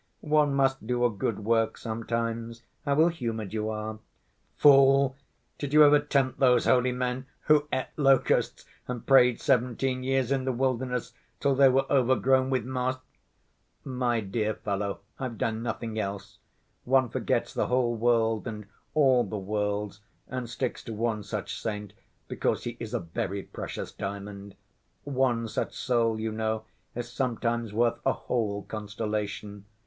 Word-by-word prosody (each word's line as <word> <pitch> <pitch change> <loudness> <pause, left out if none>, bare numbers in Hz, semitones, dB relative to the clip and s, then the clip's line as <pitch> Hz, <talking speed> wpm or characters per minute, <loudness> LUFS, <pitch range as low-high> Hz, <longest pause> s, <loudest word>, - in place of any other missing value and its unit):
"One 150 -2 +3
must 135 -4 +1
do 120 0 +1
a 120 - +3
good 105 0 -3
work 115 0 +2
sometimes. 115 0 -3 0.2
How 140 -1 +2
ill‐humored 120 - 0
you 110 0 -1
are!" 110 0 -4 0.6
"Fool! 135 -1 +6 0.4
did 145 -1 -4
you 150 0 +8
ever 145 0 +7
tempt 140 -3 0
those 125 -3 +4
holy 125 0 +3
men 125 +1 -2
who 150 -1 +3
ate 130 - 0
locusts 135 -3 +2 0.2
and 125 -2 -5
prayed 125 -3 +5
seventeen 130 -1 +1
years 130 -1 0
in 135 -1 +1
the 130 - 0
wilderness 125 -1 -1 0.3
till 140 -1 +2
they 135 0 +6
were 135 +1 +2
overgrown 130 0 +3
with 130 -4 0
moss?" 130 0 -1 0.9
"My 125 -3 0
dear 105 +1 -1
fellow, 100 -1 -3 0.2
I've 125 -4 -4
done 110 +1 -1
nothing 115 -2 -3
else. 100 -1 -5 0.4
One 130 0 +3
forgets - - -1
the - - 0
whole 125 -1 +1
world 115 -1 +1
and 105 -2 -6 0.3
all 130 -5 +5
the 105 0 -5
worlds, 105 +1 -2 0.3
and 125 -2 -5
sticks 125 +1 -3
to 115 - -5
one 110 -1 -1
such 105 0 -5
saint, 105 -2 -4 0.3
because - - -1
he 120 0 -4
is 115 -2 -5
a - - +1
very 95 +3 -4
precious - - -6
diamond. 100 0 -7 0.5
One 130 -4 0
such - - -3
soul, 115 -3 +1
you 110 0 -2
know, 110 0 -2 0.3
is 120 0 -4
sometimes 120 -3 -1
worth 115 +2 +1
a 135 - +2
whole 105 -4 -2
constellation. 105 -1 -4
120 Hz, 150 wpm, -28 LUFS, 110-130 Hz, 0.9 s, you